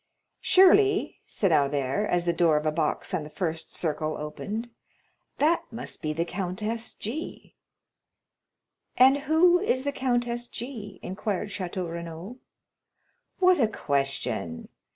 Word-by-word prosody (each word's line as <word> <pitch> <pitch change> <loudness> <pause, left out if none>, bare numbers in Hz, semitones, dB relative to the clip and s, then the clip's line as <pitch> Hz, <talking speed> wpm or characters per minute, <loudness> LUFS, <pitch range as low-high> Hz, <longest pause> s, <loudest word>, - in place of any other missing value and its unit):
"Surely," 395 +2 +4
said 195 -4 0
Albert, 140 +6 +1
as 175 -1 +1
the 170 - +2
door 165 -3 +3
of 150 - -2
a 155 - +2
box 155 -1 -1
on 155 - 0
the 150 - -9
first 165 -1 -4
circle 155 -1 -2
opened, 205 +10 -5 0.7
"that 320 +4 +3
must 230 +1 -7
be 155 - -1
the 165 +2 -1
Countess 210 +6 -3
G——." 290 +11 -6 1.4
"And 265 +2 +7
who 350 +3 +5
is 260 -9 0
the 285 - -1
Countess 240 -2 -1
G——?" 220 -7 -7
inquired 195 +1 -3
Château 185 -2 -4
Renaud. 170 +6 -7 1.0
"What 365 -2 +4
a 230 - +4
question! 135 - -2
200 Hz, 130 wpm, -27 LUFS, 160-255 Hz, 1.4 s, And